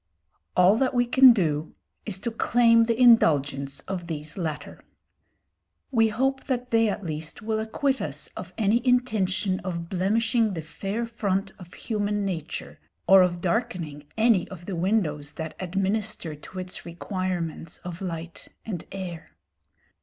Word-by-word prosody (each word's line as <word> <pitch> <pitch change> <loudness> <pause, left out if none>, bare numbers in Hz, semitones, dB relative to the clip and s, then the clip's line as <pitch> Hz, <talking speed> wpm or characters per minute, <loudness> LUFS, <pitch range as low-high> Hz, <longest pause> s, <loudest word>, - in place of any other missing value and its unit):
All 185 +4 +6
that 260 +1 +1
we 245 0 +3
can 260 +1 +8
do 160 -8 0 0.3
is 200 -3 -1
to 235 - -2
claim 230 0 +4
the 230 0 0
indulgence 145 - +4
of 180 -3 -5
these 155 -2 -4
latter. 160 -5 -5 1.1
We 225 -3 +4
hope 265 +5 0
that 250 -2 -2
they 225 -1 +4
at 205 - -3
least 155 +4 -5
will 220 0 -1
acquit 265 +5 -1
us - - -5
of - - -7
any 225 +2 +2
intention 215 -7 +1
of 170 -2 -5
blemishing 220 +3 +1
the 160 - -4
fair 195 +9 -4
front 200 -4 -1
of 180 -1 -12
human 205 -2 -1
nature, 170 -5 -5 0.3
or 195 0 +8
of 175 -1 +1
darkening 170 -7 -2
any 220 -4 +3
of 175 -3 -10
the 195 - -4
windows 165 -6 0
that 160 -2 -5
administer 195 -1 -1
to 150 +5 -12
its 185 0 -6
requirements 175 -1 -4
of 180 0 -7
light 170 -2 -6 0.2
and 190 -7 -5
air. 180 -4 -7
190 Hz, 145 wpm, -26 LUFS, 170-225 Hz, 1.1 s, can